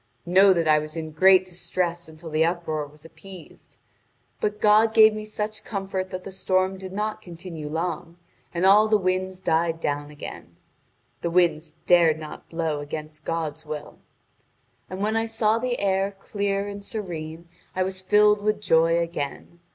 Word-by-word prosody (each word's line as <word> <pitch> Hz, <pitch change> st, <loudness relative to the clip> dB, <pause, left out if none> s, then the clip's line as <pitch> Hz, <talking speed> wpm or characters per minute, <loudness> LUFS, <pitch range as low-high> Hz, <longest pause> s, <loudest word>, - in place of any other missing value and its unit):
Know 190 Hz, +3 st, +6 dB
that 170 Hz, -3 st, +1 dB
I 155 Hz, 0 st, +5 dB
was 155 Hz, +1 st, -7 dB
in 160 Hz, -1 st, -5 dB
great 185 Hz, +4 st, +5 dB
distress 175 Hz, -1 st, -3 dB
until 160 Hz, +1 st, -11 dB
the 155 Hz, +1 st, +3 dB
uproar 165 Hz, -3 st, -1 dB
was 150 Hz, +2 st, -19 dB
appeased. 185 Hz, +1 st, -14 dB, 0.6 s
But 210 Hz, 0 st, -2 dB
God 215 Hz, +1 st, +4 dB
gave 220 Hz, -1 st, +8 dB
me 215 Hz, 0 st, -5 dB
such 215 Hz, 0 st, -5 dB
comfort 195 Hz, -2 st, -4 dB
that 185 Hz, 0 st, -6 dB
the 195 Hz, -, -8 dB
storm 185 Hz, 0 st, 0 dB
did 190 Hz, -1 st, -7 dB
not 210 Hz, +2 st, -3 dB
continue 170 Hz, -4 st, -8 dB
long, 170 Hz, +1 st, -4 dB, 0.3 s
and 175 Hz, +1 st, 0 dB
all 210 Hz, +3 st, +6 dB
the 215 Hz, 0 st, +4 dB
winds 185 Hz, -1 st, -1 dB
died 165 Hz, -2 st, 0 dB
down 145 Hz, -2 st, -2 dB
again. 150 Hz, -1 st, -10 dB, 0.7 s
The 170 Hz, -, -1 dB
winds 165 Hz, -3 st, +1 dB
dared 170 Hz, -3 st, +5 dB
not 155 Hz, -1 st, -10 dB
blow 165 Hz, -3 st, -2 dB
against 150 Hz, +1 st, -7 dB
God's 160 Hz, -2 st, -3 dB
will. 150 Hz, -1 st, -7 dB, 0.9 s
And 185 Hz, +1 st, -6 dB
when 215 Hz, +2 st, 0 dB
I 225 Hz, 0 st, +1 dB
saw 225 Hz, 0 st, +1 dB
the 250 Hz, 0 st, -1 dB
air 195 Hz, 0 st, +1 dB
clear 200 Hz, 0 st, -2 dB
and 200 Hz, 0 st, -7 dB
serene 170 Hz, -6 st, -6 dB, 0.3 s
I 185 Hz, -, +1 dB
was 185 Hz, 0 st, -4 dB
filled 210 Hz, +2 st, +4 dB
with 210 Hz, 0 st, 0 dB
joy 165 Hz, -4 st, +3 dB
again. 170 Hz, 0 st, -4 dB
180 Hz, 165 wpm, -25 LUFS, 160-200 Hz, 0.9 s, gave